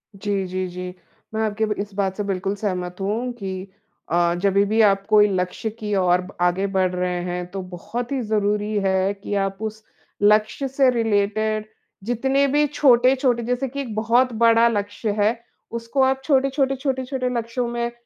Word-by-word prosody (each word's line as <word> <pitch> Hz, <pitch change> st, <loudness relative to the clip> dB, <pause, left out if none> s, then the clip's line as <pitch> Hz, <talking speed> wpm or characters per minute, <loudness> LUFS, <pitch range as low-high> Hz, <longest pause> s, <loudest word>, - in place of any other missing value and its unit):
जी, 195 Hz, 0 st, -2 dB
जी, 185 Hz, 0 st, -3 dB
जी। 180 Hz, 0 st, -6 dB, 0.4 s
मैं 220 Hz, -, -1 dB
आपकी 215 Hz, +1 st, 0 dB
ब 215 Hz, -, -1 dB
इस 205 Hz, 0 st, -4 dB
बात 195 Hz, -1 st, -1 dB
से 210 Hz, -, -1 dB
बिल्कुल 195 Hz, 0 st, -2 dB
सहमत 180 Hz, -3 st, -3 dB
हूँ 225 Hz, +6 st, -1 dB
कि 190 Hz, -4 st, -6 dB, 0.4 s
अ, 170 Hz, 0 st, +2 dB
जभी 200 Hz, 0 st, +3 dB
भी 215 Hz, +2 st, 0 dB
आप 195 Hz, -2 st, +3 dB
कोई 210 Hz, -1 st, +6 dB
लक्ष्य 185 Hz, +4 st, -2 dB
की 210 Hz, -1 st, -3 dB
ओर 180 Hz, -1 st, +3 dB
ब 185 Hz, +2 st, -11 dB
आगे 180 Hz, +2 st, +2 dB
बढ़ 190 Hz, -2 st, +1 dB
रहे 180 Hz, 0 st, -1 dB
हैं, 180 Hz, 0 st, -3 dB
तो 195 Hz, 0 st, -4 dB
बहुत 205 Hz, +7 st, -6 dB
ही 270 Hz, -2 st, 0 dB
ज़रूरी 210 Hz, 0 st, 0 dB
है 190 Hz, +1 st, +2 dB
कि 205 Hz, 0 st, -7 dB
आप 195 Hz, -1 st, -1 dB
उस 220 Hz, 0 st, -5 dB, 0.4 s
लक्ष्य 215 Hz, +6 st, +3 dB
से 270 Hz, 0 st, +3 dB
रिलेटेड 215 Hz, -1 st, 0 dB, 0.4 s
जितने 265 Hz, +5 st, +1 dB
भी 295 Hz, +2 st, +3 dB
छोटे-छोटे 255 Hz, -3 st, +3 dB
जैसे 250 Hz, +3 st, -1 dB
कि 280 Hz, +3 st, -5 dB
एक 245 Hz, -5 st, -6 dB
बहुत 235 Hz, +4 st, +2 dB
बड़ा 230 Hz, +1 st, +5 dB
लक्ष्य 205 Hz, 0 st, -2 dB
है, 215 Hz, +3 st, +2 dB, 0.3 s
उसको 230 Hz, +4 st, -2 dB
आप 265 Hz, 0 st, +1 dB
छोटे, 275 Hz, -1 st, +3 dB
छोटे, 270 Hz, 0 st, 0 dB
छोटे, 265 Hz, -1 st, -2 dB
छोटे 255 Hz, -1 st, -2 dB
लक्ष्यों 235 Hz, +2 st, -2 dB
में 235 Hz, 0 st, -2 dB
215 Hz, 185 wpm, -22 LUFS, 195-245 Hz, 0.4 s, कोई